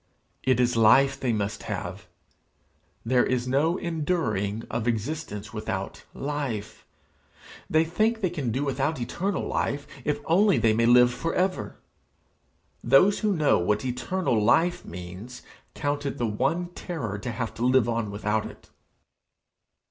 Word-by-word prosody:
It 130 Hz, -2 st, +2 dB
is 125 Hz, 0 st, +2 dB
life 135 Hz, +5 st, +5 dB
they 125 Hz, -, 0 dB
must 105 Hz, -2 st, -2 dB
have; -, -, -5 dB, 1.0 s
there 125 Hz, +1 st, +3 dB
is 125 Hz, -1 st, -1 dB
no 150 Hz, +7 st, +2 dB
enduring 135 Hz, -, -1 dB
of 115 Hz, 0 st, -3 dB
existence 115 Hz, -2 st, -3 dB
without 105 Hz, -3 st, -5 dB
life. 135 Hz, -7 st, -4 dB, 0.8 s
They 160 Hz, +1 st, +3 dB
think 215 Hz, +7 st, +1 dB
they 185 Hz, -5 st, 0 dB
can 145 Hz, -9 st, -2 dB
do 130 Hz, +5 st, -1 dB
without 140 Hz, +2 st, -1 dB
eternal 185 Hz, +11 st, -2 dB
life, 140 Hz, +1 st, -1 dB, 0.2 s
if 150 Hz, -, -1 dB
only 195 Hz, +4 st, +4 dB
they 110 Hz, -2 st, +3 dB
may 115 Hz, +1 st, +2 dB
live 125 Hz, 0 st, +6 dB
for 165 Hz, +6 st, -3 dB
ever! 185 Hz, 0 st, -1 dB, 1.1 s
Those 190 Hz, +9 st, +5 dB
who 210 Hz, -2 st, +1 dB
know 155 Hz, -3 st, +3 dB
what 105 Hz, +7 st, 0 dB
eternal 125 Hz, -, 0 dB
life 175 Hz, +10 st, +3 dB
means 90 Hz, +8 st, -9 dB, 0.3 s
count 145 Hz, 0 st, -2 dB
it -, -, -4 dB
the 120 Hz, -, 0 dB
one 135 Hz, +11 st, -1 dB
terror 140 Hz, -, -5 dB
to 120 Hz, +3 st, -4 dB
have 115 Hz, 0 st, -4 dB
to 115 Hz, -, -5 dB
live 125 Hz, -2 st, +4 dB
on 115 Hz, -2 st, -1 dB
without 105 Hz, +1 st, -1 dB
it. -, -, -15 dB
130 Hz, 145 wpm, -26 LUFS, 110-160 Hz, 1.1 s, live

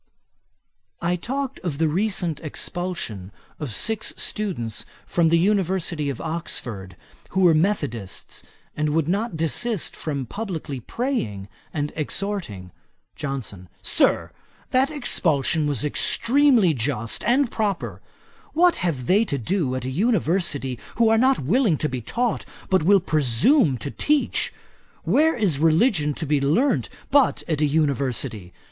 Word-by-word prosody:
I 175 Hz, +1 st, 0 dB
talked 270 Hz, +8 st, -3 dB
of 165 Hz, -6 st, -3 dB
the 160 Hz, +1 st, +2 dB
recent 175 Hz, -2 st, 0 dB
expulsion 155 Hz, -, -4 dB, 0.3 s
of 145 Hz, -6 st, -4 dB
six 220 Hz, -, 0 dB
students 170 Hz, -, -2 dB, 0.2 s
from 170 Hz, -1 st, +2 dB
the 170 Hz, -, +4 dB
University 180 Hz, -5 st, +1 dB
of 135 Hz, -, -4 dB
Oxford, 115 Hz, -, -5 dB, 0.3 s
who 190 Hz, -, 0 dB
were 175 Hz, -3 st, +6 dB
methodists 145 Hz, -, -2 dB, 0.3 s
and 150 Hz, 0 st, 0 dB
would 160 Hz, -2 st, +1 dB
not 200 Hz, 0 st, -1 dB
desist 195 Hz, +6 st, 0 dB
from 140 Hz, -4 st, -3 dB
publickly 165 Hz, -, -5 dB
praying 115 Hz, -, -3 dB, 0.2 s
and 145 Hz, -1 st, -3 dB
exhorting. 155 Hz, -, -3 dB, 0.4 s
JOHNSON. 115 Hz, -10 st, -5 dB
'Sir, -, -, +2 dB, 0.4 s
that 260 Hz, +2 st, +3 dB
expulsion 165 Hz, -, +1 dB
was 145 Hz, -3 st, -1 dB
extremely 240 Hz, -, +3 dB
just 115 Hz, -3 st, -2 dB
and 245 Hz, +2 st, +3 dB
proper. 205 Hz, -5 st, -2 dB, 0.5 s
What 350 Hz, +2 st, +4 dB
have 155 Hz, -8 st, -2 dB
they 200 Hz, -, +4 dB
to 140 Hz, -, -2 dB
do 140 Hz, -, -1 dB
at 130 Hz, -1 st, -4 dB
an 130 Hz, -, -3 dB
University 170 Hz, -, 0 dB, 0.2 s
who 230 Hz, -1 st, +4 dB
are 225 Hz, -, +4 dB
not 260 Hz, +2 st, +4 dB
willing 190 Hz, -, +2 dB
to 155 Hz, -, -1 dB
be 130 Hz, -3 st, -4 dB
taught, 235 Hz, -, -1 dB, 0.3 s
but 190 Hz, -, +4 dB
will 195 Hz, +5 st, +5 dB
presume 155 Hz, -, +3 dB
to 140 Hz, -, -5 dB
teach? 300 Hz, -1 st, +1 dB, 0.5 s
Where 320 Hz, +2 st, +3 dB
is 190 Hz, -, +1 dB
religion 160 Hz, -, +3 dB
to 160 Hz, -, -4 dB
be 145 Hz, -1 st, +1 dB
learnt 215 Hz, -, +2 dB, 0.2 s
but 285 Hz, -3 st, +3 dB
at 155 Hz, -3 st, -1 dB
an 150 Hz, -, +3 dB
University? 135 Hz, -, -1 dB
165 Hz, 135 wpm, -23 LUFS, 140-210 Hz, 0.5 s, were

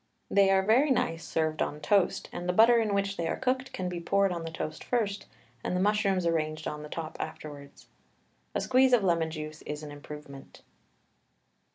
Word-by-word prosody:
They 200 Hz, -1 st, +5 dB
are 190 Hz, 0 st, +4 dB
very 245 Hz, +9 st, +4 dB
nice 165 Hz, -10 st, 0 dB
served 155 Hz, -1 st, -1 dB
on 150 Hz, -, -1 dB
toast, 190 Hz, +4 st, +2 dB
and 175 Hz, +1 st, -5 dB
the -, -, +2 dB
butter 230 Hz, +4 st, +6 dB
in 215 Hz, -3 st, 0 dB
which 200 Hz, 0 st, -1 dB
they 170 Hz, -, -1 dB
are -, -, -1 dB
cooked 260 Hz, +1 st, -1 dB
can 185 Hz, -, -3 dB
be 175 Hz, -1 st, -3 dB
poured 195 Hz, +3 st, +2 dB
on 170 Hz, -2 st, -3 dB
the 165 Hz, -, -4 dB
toast 155 Hz, -1 st, -5 dB
first, 210 Hz, -5 st, -1 dB, 0.4 s
and -, -, -1 dB
the -, -, +1 dB
mushrooms 200 Hz, -2 st, +2 dB
arranged 155 Hz, -2 st, -1 dB
on 150 Hz, 0 st, -4 dB
the 150 Hz, -, -9 dB
top 160 Hz, 0 st, -6 dB
afterwards. 145 Hz, -2 st, -8 dB, 0.7 s
A -, -, +1 dB
squeeze 260 Hz, 0 st, +4 dB
of 235 Hz, -4 st, +5 dB
lemon 170 Hz, -3 st, +2 dB
juice 155 Hz, -1 st, -7 dB
is 150 Hz, +1 st, -6 dB
an 150 Hz, -, -7 dB
improvement. 145 Hz, -1 st, -11 dB
175 Hz, 195 wpm, -29 LUFS, 155-200 Hz, 0.7 s, butter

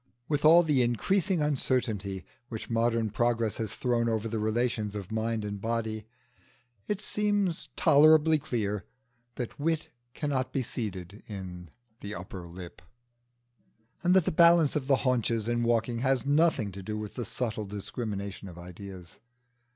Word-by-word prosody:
With 145 Hz, -1 st, 0 dB
all 165 Hz, +3 st, +8 dB
the 150 Hz, -5 st, +3 dB
increasing 165 Hz, -, +1 dB
uncertainty 115 Hz, -9 st, -1 dB, 0.2 s
which 110 Hz, 0 st, -6 dB
modern 115 Hz, -1 st, +1 dB
progress 115 Hz, -1 st, +1 dB
has 110 Hz, -3 st, -3 dB
thrown 120 Hz, -2 st, +1 dB
over 110 Hz, 0 st, -1 dB
the 110 Hz, 0 st, -2 dB
relations 110 Hz, -1 st, 0 dB
of 100 Hz, -2 st, -6 dB
mind 110 Hz, 0 st, -1 dB
and 100 Hz, -1 st, -5 dB
body, 110 Hz, -1 st, -2 dB, 0.8 s
it 205 Hz, -2 st, -1 dB
seems 205 Hz, -4 st, 0 dB
tolerably 155 Hz, 0 st, +6 dB
clear 105 Hz, -8 st, -2 dB, 0.5 s
that 125 Hz, +1 st, -5 dB
wit 160 Hz, +1 st, 0 dB, 0.3 s
cannot 130 Hz, -4 st, -1 dB
be 135 Hz, -, -1 dB
seated 100 Hz, -5 st, -5 dB
in 90 Hz, -4 st, -7 dB, 0.3 s
the 105 Hz, +1 st, -6 dB
upper 90 Hz, 0 st, -7 dB
lip, 90 Hz, +1 st, -10 dB, 1.2 s
and 180 Hz, 0 st, +3 dB
that 185 Hz, -4 st, +5 dB
the -, -, +1 dB
balance 170 Hz, -2 st, +5 dB
of 140 Hz, -3 st, -1 dB
the 140 Hz, -, +5 dB
haunches 115 Hz, -3 st, +1 dB
in 120 Hz, 0 st, +1 dB
walking 115 Hz, 0 st, +1 dB
has 130 Hz, 0 st, +1 dB
nothing 145 Hz, -7 st, +3 dB
to 100 Hz, +1 st, -8 dB
do 105 Hz, +3 st, -4 dB
with 105 Hz, -1 st, -6 dB
the 125 Hz, -, -4 dB
subtle 110 Hz, -3 st, -3 dB
discrimination 100 Hz, -1 st, -5 dB
of 85 Hz, -2 st, -10 dB
ideas. 90 Hz, 0 st, -10 dB
115 Hz, 150 wpm, -29 LUFS, 105-140 Hz, 1.2 s, all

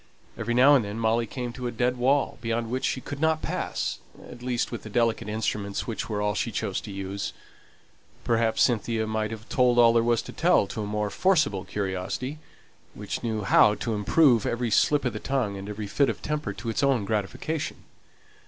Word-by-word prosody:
Every 120 Hz, +1 st, -2 dB
now 135 Hz, +4 st, +7 dB
and 135 Hz, -5 st, +5 dB
then 100 Hz, +1 st, -5 dB
Molly 115 Hz, +1 st, +1 dB
came 120 Hz, +1 st, -5 dB
to 125 Hz, -1 st, -4 dB
a -, -, -3 dB
dead 125 Hz, +2 st, 0 dB
wall, 135 Hz, +3 st, +1 dB
beyond 115 Hz, 0 st, -2 dB
which 130 Hz, +1 st, -1 dB
she 130 Hz, -, -1 dB
could 145 Hz, -, -7 dB
not 160 Hz, 0 st, +1 dB
pass -, -, -2 dB, 0.3 s
at 120 Hz, -, -11 dB
least 125 Hz, -1 st, -1 dB
with 120 Hz, -, -5 dB
the 110 Hz, -, -9 dB
delicate 115 Hz, -1 st, 0 dB
instruments 105 Hz, -2 st, -2 dB
which 115 Hz, -1 st, -4 dB
were 105 Hz, -1 st, -1 dB
all 105 Hz, 0 st, +1 dB
she -, -, -2 dB
chose -, -, -2 dB
to -, -, -8 dB
use. 100 Hz, 0 st, -4 dB, 0.9 s
Perhaps 115 Hz, -2 st, +2 dB
Cynthia 115 Hz, -2 st, +1 dB
might 110 Hz, 0 st, -1 dB
have 110 Hz, +1 st, -8 dB
told 125 Hz, -1 st, +3 dB
all 115 Hz, -1 st, +7 dB
there 115 Hz, -, +4 dB
was 120 Hz, 0 st, +1 dB
to -, -, -9 dB
tell -, -, +3 dB
to 110 Hz, +3 st, -5 dB
a 105 Hz, -, -3 dB
more 105 Hz, 0 st, -2 dB
forcible 155 Hz, -, +2 dB
curiosity, 100 Hz, +9 st, -3 dB, 0.6 s
which 105 Hz, -1 st, -5 dB
knew 110 Hz, -3 st, -2 dB
how 105 Hz, +2 st, +5 dB
to 115 Hz, +2 st, -3 dB
improve 115 Hz, +3 st, +3 dB
every 120 Hz, -1 st, -1 dB
slip 145 Hz, +6 st, +3 dB
of 125 Hz, -, 0 dB
the 110 Hz, -, -4 dB
tongue 125 Hz, -7 st, -1 dB
and 100 Hz, +1 st, -7 dB
every 105 Hz, 0 st, -5 dB
fit 135 Hz, +6 st, +2 dB
of 110 Hz, -, -5 dB
temper 150 Hz, -8 st, -2 dB
to 105 Hz, +3 st, -6 dB
its 110 Hz, -, -1 dB
own 135 Hz, -7 st, +2 dB
gratification. 110 Hz, +9 st, -3 dB
115 Hz, 205 wpm, -26 LUFS, 105-125 Hz, 0.9 s, now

